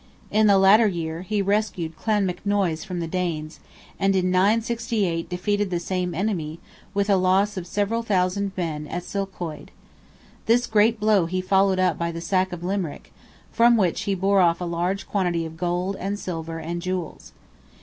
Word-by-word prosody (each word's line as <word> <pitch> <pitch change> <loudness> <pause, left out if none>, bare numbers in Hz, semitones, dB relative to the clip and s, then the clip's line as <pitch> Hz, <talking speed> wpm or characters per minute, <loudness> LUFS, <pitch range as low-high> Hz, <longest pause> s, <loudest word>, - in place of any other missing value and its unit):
In 215 0 +4
the 200 -1 +6
latter 200 +4 +6
year, 165 -3 -3
he 205 +2 -1
rescued 195 -5 -1
Clonmacnoise 195 -4 0
from 180 -2 -4
the 165 - -3
Danes, 165 -3 -3 0.4
and 195 0 +2
in 185 -1 +1
968 210 -3 +1
defeated 205 +3 -1
the 175 -2 -1
same 180 0 -2
enemy, 170 -5 -2 0.4
with 200 0 +1
a 200 -2 +4
loss 190 +3 +2
of 180 -2 -5
several 205 +5 0
thousand 200 -2 0
men 155 -4 -3
at 175 +4 -4
Sulchoid. 180 -6 -5 0.8
This 240 +2 +4
great 220 0 +3
blow 210 -5 +3
he 185 +2 -2
followed 190 +1 +2
up 185 -4 +1
by 170 0 -1
the 165 - -6
sack 185 +2 0
of 175 -1 -7
Limerick, 185 -4 -4 0.4
from 235 0 +5
which 185 -6 +1
"he 195 - +2
bore 195 +1 +3
off 170 -1 +3
a 180 - -3
large 175 +3 -2
quantity 175 -4 0
of 160 0 -8
gold, 180 +3 -1
and 200 +2 -3
silver, 165 -4 -5
and 170 +2 -4
jewels." 185 -2 -5
185 Hz, 170 wpm, -24 LUFS, 170-200 Hz, 0.8 s, the